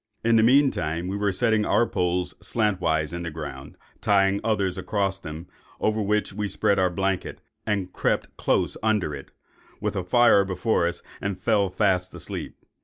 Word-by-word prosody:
In 115 Hz, 0 st, +3 dB
the 110 Hz, -, +6 dB
mean 135 Hz, +4 st, +5 dB
time, 85 Hz, +3 st, -3 dB
we 95 Hz, -, -3 dB
were 100 Hz, 0 st, +1 dB
setting 110 Hz, +2 st, +2 dB, 0.3 s
poles 90 Hz, 0 st, 0 dB
slantwise 90 Hz, -8 st, 0 dB
in 85 Hz, -, -4 dB
the 85 Hz, -, -4 dB
ground, 75 Hz, -3 st, -8 dB, 0.2 s
tying 100 Hz, 0 st, +3 dB
others 100 Hz, -5 st, 0 dB
across 100 Hz, -2 st, -1 dB
them; 80 Hz, -1 st, -8 dB, 0.3 s
over 110 Hz, 0 st, +1 dB
which 105 Hz, 0 st, 0 dB
we 105 Hz, +1 st, -2 dB
spread 100 Hz, 0 st, +1 dB
our 95 Hz, -1 st, +3 dB
blanket, 95 Hz, +1 st, -2 dB, 0.3 s
and 100 Hz, -4 st, -1 dB
crept -, -, -1 dB
close -, -, 0 dB
under 105 Hz, -8 st, +1 dB
it, 70 Hz, -1 st, -8 dB, 0.5 s
with -, -, -2 dB
a 95 Hz, -, -1 dB
fire 110 Hz, +1 st, +5 dB
before 95 Hz, -1 st, 0 dB
us, 85 Hz, -, -4 dB, 0.2 s
and 100 Hz, -1 st, -2 dB
fell 100 Hz, -1 st, +2 dB
fast 95 Hz, -1 st, +1 dB
asleep. 85 Hz, -4 st, -7 dB
95 Hz, 170 wpm, -25 LUFS, 90-105 Hz, 0.5 s, the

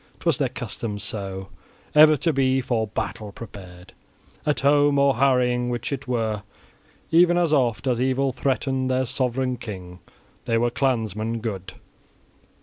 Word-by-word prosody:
'Twas -, -, +1 dB
their -, -, +1 dB
custom 105 Hz, -3 st, -5 dB
so 95 Hz, -2 st, -5 dB, 0.4 s
ever 155 Hz, 0 st, +7 dB
to 165 Hz, +4 st, +1 dB
be 135 Hz, -1 st, +2 dB
for 120 Hz, -3 st, -1 dB
battle 105 Hz, 0 st, -4 dB
prepared, 95 Hz, -4 st, -11 dB, 0.5 s
at 150 Hz, -, +1 dB
home, 145 Hz, +1 st, +4 dB
or 140 Hz, -3 st, +3 dB
harrying, 125 Hz, -2 st, +2 dB
which 120 Hz, +1 st, -3 dB
it 135 Hz, -1 st, -5 dB
were, 110 Hz, -4 st, -1 dB, 0.7 s
even 175 Hz, +1 st, +5 dB
as 170 Hz, -3 st, +2 dB
oft 120 Hz, -8 st, +1 dB
as 125 Hz, -2 st, +1 dB
evil 130 Hz, +1 st, +1 dB
threatened 130 Hz, 0 st, -1 dB
their 130 Hz, 0 st, +1 dB
sovran 130 Hz, 0 st, -1 dB
king. 90 Hz, -6 st, -8 dB, 0.5 s
They 115 Hz, -2 st, +1 dB
were 120 Hz, +1 st, +1 dB
clansmen 115 Hz, -4 st, -1 dB
good. 100 Hz, -5 st, -5 dB
125 Hz, 145 wpm, -24 LUFS, 110-135 Hz, 0.7 s, ever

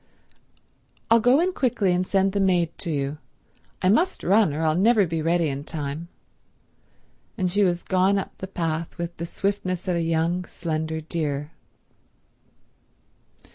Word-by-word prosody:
"I'll 230 Hz, -, +7 dB
go 245 Hz, +6 st, +4 dB
on 365 Hz, +1 st, +1 dB
quickly 210 Hz, -, +1 dB
and 180 Hz, +1 st, 0 dB
send 195 Hz, 0 st, +2 dB
the 200 Hz, -, -1 dB
maid 175 Hz, -4 st, +2 dB
to -, -, -2 dB
you. 145 Hz, -1 st, -2 dB, 0.6 s
I 185 Hz, -, +4 dB
must 340 Hz, -, +2 dB
run, 200 Hz, -1 st, +4 dB
or 155 Hz, +3 st, -2 dB
I'll 155 Hz, -1 st, +3 dB
never 205 Hz, +4 st, +4 dB
be 165 Hz, -1 st, -2 dB
ready 165 Hz, +1 st, +2 dB
in 140 Hz, 0 st, -3 dB
time—" 150 Hz, +1 st, -5 dB, 1.3 s
And 185 Hz, -3 st, 0 dB
she 205 Hz, +2 st, +3 dB
was 175 Hz, -2 st, +1 dB
gone 190 Hz, +1 st, +2 dB
up 195 Hz, -, -4 dB
the 190 Hz, -, -5 dB
path 165 Hz, -3 st, -3 dB
with 170 Hz, 0 st, -4 dB
the 170 Hz, -, -4 dB
swiftness 190 Hz, -1 st, -2 dB
of 180 Hz, -, +1 dB
a 170 Hz, -, 0 dB
young, 165 Hz, +2 st, 0 dB
slender 160 Hz, -2 st, -3 dB
deer. 150 Hz, -2 st, -3 dB
175 Hz, 155 wpm, -24 LUFS, 160-195 Hz, 1.3 s, I'll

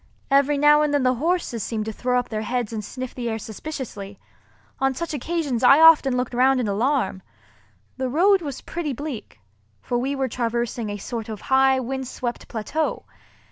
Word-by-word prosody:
Every 280 Hz, +1 st, +4 dB
now 295 Hz, +1 st, +5 dB
and 300 Hz, -1 st, +1 dB
then 290 Hz, -2 st, +2 dB
the 255 Hz, 0 st, +3 dB
horses 310 Hz, -3 st, -1 dB
seemed 215 Hz, 0 st, -3 dB
to 220 Hz, -, -3 dB
throw 250 Hz, +3 st, 0 dB
up 245 Hz, -, -1 dB
their 215 Hz, -1 st, -3 dB
heads 240 Hz, 0 st, -2 dB
and 215 Hz, -1 st, -4 dB
sniff 255 Hz, +4 st, -6 dB
the 240 Hz, -2 st, -3 dB
air 220 Hz, -, -2 dB
suspiciously. 215 Hz, -4 st, -7 dB, 0.6 s
On 270 Hz, 0 st, +1 dB
such 335 Hz, +2 st, -4 dB
occasions 290 Hz, -4 st, -2 dB
I 275 Hz, +4 st, +7 dB
often 305 Hz, -5 st, +6 dB
looked 250 Hz, 0 st, -2 dB
round 260 Hz, +2 st, +3 dB
in 240 Hz, -, -1 dB
alarm. 205 Hz, -2 st, 0 dB, 0.8 s
The 260 Hz, -1 st, -2 dB
road 375 Hz, +8 st, +4 dB
was 285 Hz, -5 st, -6 dB
pretty 320 Hz, -4 st, -4 dB
bleak, 255 Hz, -, -7 dB, 0.4 s
for 240 Hz, -, -2 dB
we 270 Hz, +3 st, -1 dB
were 270 Hz, -1 st, 0 dB
traversing 235 Hz, -1 st, -2 dB
a 205 Hz, -, -4 dB
sort 225 Hz, +2 st, -6 dB
of 215 Hz, -2 st, -6 dB
high 265 Hz, 0 st, +5 dB
windswept 255 Hz, -1 st, -4 dB
plateau. 255 Hz, +8 st, -3 dB
255 Hz, 180 wpm, -23 LUFS, 230-285 Hz, 0.8 s, I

